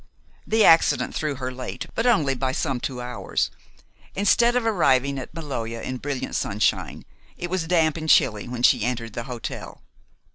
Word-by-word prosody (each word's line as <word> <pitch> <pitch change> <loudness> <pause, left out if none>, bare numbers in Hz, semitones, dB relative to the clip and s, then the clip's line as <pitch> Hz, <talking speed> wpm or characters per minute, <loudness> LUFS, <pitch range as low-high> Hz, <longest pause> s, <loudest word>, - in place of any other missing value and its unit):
The 220 0 +4
accident 165 - +4
threw 150 -2 -2
her 130 -1 -4
late, 125 0 -6
but 230 - 0
only 160 - +3
by 130 0 -2
some 130 -1 -1
two 125 0 -4
hours. 125 0 -2 0.6
Instead 235 +5 +3
of 250 -2 +1
arriving 140 - +2
at 130 - -8
Maloja 130 -8 -5
in 130 +2 -4
brilliant 140 0 -4
sunshine, 105 +1 -1 0.3
it 175 0 -5
was 185 -3 -1
damp 160 -2 +2
and 160 0 -4
chilly 105 -6 +3
when 120 0 -5
she - - +5
entered 115 -3 -3
the 120 - -5
hotel. 125 -3 -7
135 Hz, 170 wpm, -24 LUFS, 125-165 Hz, 0.6 s, she